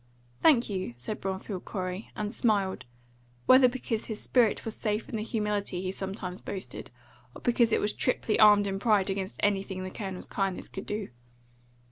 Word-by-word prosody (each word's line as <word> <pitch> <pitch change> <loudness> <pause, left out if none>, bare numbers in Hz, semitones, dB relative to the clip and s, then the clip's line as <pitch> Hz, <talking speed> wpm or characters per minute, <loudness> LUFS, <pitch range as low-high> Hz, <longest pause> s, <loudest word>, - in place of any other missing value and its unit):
"Thank 265 -7 +5
you," 185 - -3
said 165 - -5
Bromfield 190 0 -4
Corey, 185 +1 -4
and 210 +1 -3
smiled 200 - +1 0.6
whether 255 0 +8
because 240 -3 -3
his 215 -2 -5
spirit 240 -4 +2
was 225 - -3
safe 215 0 -2
in - - -5
the 215 - -1
humility 210 -4 -1
he 185 0 -2
sometimes 190 -1 -5
boasted, 195 -1 -6 0.5
or - - -10
because 240 -2 +3
it - - +3
was 210 - 0
triply 235 -3 0
armed 210 -1 +7
in 195 -1 -2
pride 205 -3 +3
against 190 0 -4
anything 195 -2 0
the 185 - -5
Colonel's 190 -3 -5
kindness 195 -2 -2
could 195 - -7
do. 210 -1 -3
205 Hz, 170 wpm, -29 LUFS, 190-220 Hz, 0.6 s, whether